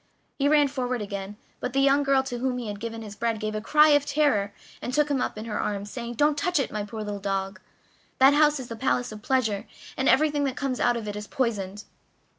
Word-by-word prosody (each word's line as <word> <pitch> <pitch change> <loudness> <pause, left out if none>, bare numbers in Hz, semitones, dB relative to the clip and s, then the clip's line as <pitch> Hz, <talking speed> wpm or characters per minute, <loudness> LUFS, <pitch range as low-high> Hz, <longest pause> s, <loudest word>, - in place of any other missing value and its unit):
He 280 - +3
ran 295 -1 +5
forward 255 -2 -2
to 215 - -4
begin, 200 0 -6 0.2
but 250 - -4
the 270 - +2
young 275 +1 +4
girl 275 -1 +3
to 245 -2 -5
whom 255 0 -1
he 240 -3 -4
had 205 -1 -6
given 225 0 -5
his 210 -1 -9
bread 230 0 -1
gave 215 0 -3
a 215 - -3
cry 300 +6 +5
of 290 -1 +5
terror 285 -9 +1 0.3
and 245 - -4
took 295 +2 +2
him 270 -3 +1
up - - -2
in 215 - -6
her 215 -2 -3
arms, 205 0 -3
saying: 240 -1 -5
"Don't 295 +3 +3
touch 360 -1 +1
it, 275 - -1
my 210 -1 -3
poor 215 +1 -6
little 205 -1 -4
dog 195 0 -3 0.6
that 270 +2 +7
house 300 0 +4
is 255 - -7
the 230 - -6
palace 245 0 0
of 215 -1 -9
pleasure, 220 -5 0 0.3
and 265 - +1
everything 290 +1 +3
that 265 -2 -2
comes 270 -3 -2
out 240 - +2
of 220 -2 -6
it 205 - -4
is 210 0 -6
poisoned!" 210 -5 -2
245 Hz, 250 wpm, -26 LUFS, 210-275 Hz, 0.6 s, that